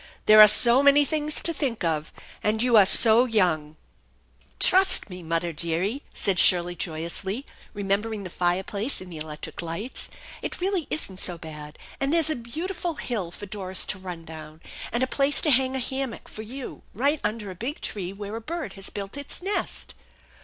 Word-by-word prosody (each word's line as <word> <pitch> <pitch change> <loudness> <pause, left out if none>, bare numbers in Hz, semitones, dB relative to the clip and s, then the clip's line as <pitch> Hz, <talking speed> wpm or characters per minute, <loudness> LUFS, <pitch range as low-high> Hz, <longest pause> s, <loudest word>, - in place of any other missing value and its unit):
" - - -32
There 215 0 +8
are 210 - +11
so 235 +4 +7
many 285 +1 +5
things 305 0 -1
to 335 - 0
think 265 - -3
of, 155 -2 -2 0.3
and 220 +2 0
you 245 -2 +2
are 205 -3 +7
so 230 +4 +9
young." 175 -10 0 0.8
"Trust 375 - +4
me, 180 0 -8
mudder 165 +1 -2
dearie," 170 - -1
said 190 -3 -1
Shirley 175 -1 +4
joyously, 175 - -4 0.3
re 205 - -5
membering 205 +2 -2
the 185 - -8
fireplace 190 +8 -1
and 185 -1 -11
the 155 - -8
electric 150 +1 -7
lights. 170 +10 -6 0.2
" - - -15
It - - -6
really 370 -3 -1
isn't 190 -11 -3
so 175 -3 -3
bad; 150 -2 -10 0.2
and 275 0 0
there's 325 -1 +2
a - - -1
beautiful 330 +8 -5
hill 215 -11 -4
for 190 +4 -10
Doris 190 -2 -1
to 190 - -3
run 180 -3 -8
down, 155 0 -11 0.3
and 240 +3 0
a - - +3
place 275 +2 +1
to 305 - +2
hang 260 0 +4
a - - +1
hammock 265 -1 -2
for 215 - -9
you 250 +4 -9
right 280 +6 +1
under 210 -1 -3
a - - -7
big 250 - -5
tree 190 -3 -5
where 205 +2 -7
a 230 - -6
bird 315 - -6
has 195 0 -5
built 200 +5 -7
its 285 - -6
nest." 400 +2 -2
210 Hz, 195 wpm, -25 LUFS, 180-270 Hz, 0.8 s, are